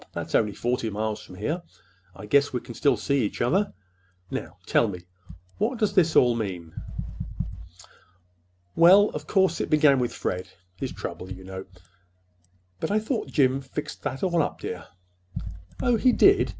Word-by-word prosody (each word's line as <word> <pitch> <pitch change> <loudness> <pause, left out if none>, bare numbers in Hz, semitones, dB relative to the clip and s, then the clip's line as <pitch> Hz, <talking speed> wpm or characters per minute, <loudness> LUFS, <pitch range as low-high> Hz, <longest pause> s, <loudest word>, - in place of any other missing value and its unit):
That's - - -5
only 105 -2 +3
forty 120 0 -1
miles 110 +1 -2
from 90 - -12
here. 150 - -2 0.5
I 95 - -9
guess 140 +6 +3
we 125 - -1
can 120 - -10
still 130 +1 +2
see 140 +5 +1
each 105 - -3
other. 185 +13 +2 0.6
Now, - - -5
tell 115 - +3
me, 90 -4 -5 0.6
what 230 +5 0
does 215 -3 +1 0.2
all 120 -1 +6
this - - -2
mean?" 90 -6 -4 2.0
"Well, 190 +5 +7
of - - -7
course, 190 -4 +2
it - - -2
began 150 -3 +5
with 120 -1 0
Fred—his 90 0 -5
trouble, 95 +1 -6
you 95 0 -8
know." 95 0 -7 1.1
"But - - -2
I 205 - +2
thought 220 +3 -1
Jim 135 -2 +2
fixed 135 +2 -6
that 135 +1 -4
all 175 -3 +3
up, 145 - -2
dear." 90 - -5 1.0
"Oh, 245 -2 +3
he 255 +3 +4
did. 395 +9 +5
130 Hz, 160 wpm, -26 LUFS, -, 2.0 s, Well